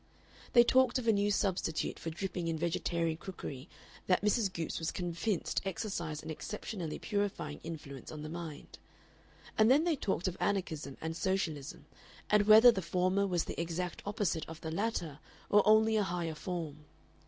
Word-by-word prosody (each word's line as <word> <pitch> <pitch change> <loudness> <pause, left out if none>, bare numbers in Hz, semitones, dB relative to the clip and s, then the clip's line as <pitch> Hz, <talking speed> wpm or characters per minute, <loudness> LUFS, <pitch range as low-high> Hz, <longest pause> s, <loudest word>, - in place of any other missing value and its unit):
They 240 - +9
talked 260 +1 +4
of 245 -2 -3
a - - +7
new 205 0 +2
substitute 190 -5 0
for 165 - -4
dripping 175 +1 -3
in 165 -1 -1
vegetarian 165 0 -1
cookery 160 -5 -7 0.4
that 185 +1 +3
Mrs. 210 -1 +2
Goopes 165 -3 -3
was 160 - -1
convinced 175 +2 -1
exercised 170 -5 -3
an 160 - -5
exceptionally 180 0 -5
purifying 200 -8 -2
influence 145 -5 -7
on 150 -1 -7
the - - -5
mind. 160 -2 -8 0.8
And 215 +1 +6
then 280 +5 +6
they 340 -2 +2
talked 190 -8 -1
of 185 - -3
Anarchism 160 -8 -2
and 160 0 -3
Socialism, 165 -7 -2 0.5
and 210 -1 +4
whether 220 +3 +10
the 195 - -2
former 185 +3 +1
was 175 -3 +1
the - - -4
exact 170 +1 -3
opposite 200 -6 -1
of 160 0 -8
the 160 - -4
latter 170 -6 -2 0.3
or 205 - +7
only 220 +1 +5
a 210 - +3
higher 170 -3 -2
form. 155 -3 -5
180 Hz, 165 wpm, -33 LUFS, 160-205 Hz, 0.8 s, whether